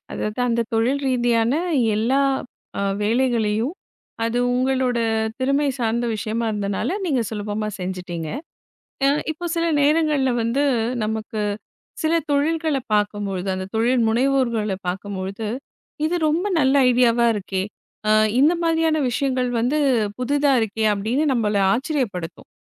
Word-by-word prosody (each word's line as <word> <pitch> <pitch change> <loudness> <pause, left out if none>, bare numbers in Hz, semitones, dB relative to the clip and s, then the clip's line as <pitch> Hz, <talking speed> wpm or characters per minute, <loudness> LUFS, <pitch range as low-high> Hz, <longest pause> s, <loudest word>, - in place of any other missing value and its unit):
அதாவது 215 +2 -4
அந்தத் 235 -1 0
தொழில் 240 +5 +1
ரீதியான 240 -2 +2 0.4
எல்லா 245 +6 +2 0.6
அ - - 0 0.2
வேலைகளையும் 230 - +1 0.5
அது 230 +1 0 0.2
உங்களோட 255 -1 +1 0.4
திறமை 275 +3 +1
சார்ந்த 235 0 0
விஷயமா 220 +2 -2
இருந்தனால, 200 -2 -2 0.2
நீங்க 280 -8 +1
சுலபமா 210 0 -3
செஞ்சுட்டீங்க. 180 -3 -5 0.8
அ - - +5 0.2
இப்போ 335 +3 -7
சில 335 - +1 0.2
நேரங்கள்ல 300 -3 +2
வந்து, 235 +5 +1 0.4
நமக்கு 220 0 -3 0.6
சில 315 +1 +1 0.2
தொழில்களை 305 0 +1
பாக்கும்பொழுது 205 -2 -1
அந்த 185 0 -4
தொழில் 240 +2 +2
முனைவோர்கள 235 -4 +1
பாக்கும்பொழுது 195 +2 -4 0.6
இது 350 - 0
ரொம்ப 325 +5 0 0.2
நல்ல 265 +1 +3 0.2
ஐடியாவா 240 -1 +3
இருக்கே. 190 -2 -2 0.5
அ - - +4 0.3
இந்த 300 +5 +5
மாதிரியான 325 -1 +2
விஷயங்கள் 255 -1 0
வந்து, 260 +6 +1 0.4
புதுதா 285 +2 +2
இருக்கே 220 0 -1
அப்படின்னு 230 +10 0
நம்மளை 210 -4 +1
ஆச்சரியப்படுத்தும். 240 - -3
235 Hz, 115 wpm, -22 LUFS, 210-275 Hz, 0.8 s, அ